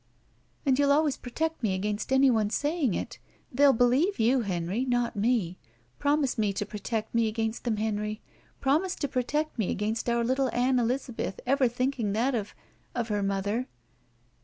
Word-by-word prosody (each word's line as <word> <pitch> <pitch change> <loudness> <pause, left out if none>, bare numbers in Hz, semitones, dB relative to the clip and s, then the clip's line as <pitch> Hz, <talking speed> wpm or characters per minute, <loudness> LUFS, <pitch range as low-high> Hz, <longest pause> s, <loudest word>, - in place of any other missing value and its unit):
And 270 -1 +3
you'll 285 0 +4
always 295 -1 +3
protect 320 +6 -3
me 205 -5 +1
against 210 +5 -3
anyone 255 -6 +4
sajdng 290 - 0
it? - - -5 0.3
They'll 280 +2 +5
believe 260 - +2
you, 245 +3 +3
Henry, 190 +2 -2
not 245 -2 0
me. 205 -5 0 0.4
Promise 285 -4 +1
me 205 -2 +1
to 205 - -2
protect 215 +2 -4
me 230 -1 +3
against 225 +1 -2
them, 225 -3 0
Henry. 210 0 -2 0.4
Promise 320 +8 +1
to 285 - -2
protect 285 +2 -2
me 205 - 0
against 215 +4 -2
otir 235 0 +1
little 260 +2 +1
Ann 250 +1 +3
Elizabeth 240 -4 -2
ever 265 0 +3
thinking 245 -3 -1
that 245 +6 +1
of 210 -4 -3 0.2
— - - -37
of 240 -2 -2
her 205 -1 0
mother." 200 +5 -1
240 Hz, 165 wpm, -28 LUFS, 215-270 Hz, 0.4 s, They'll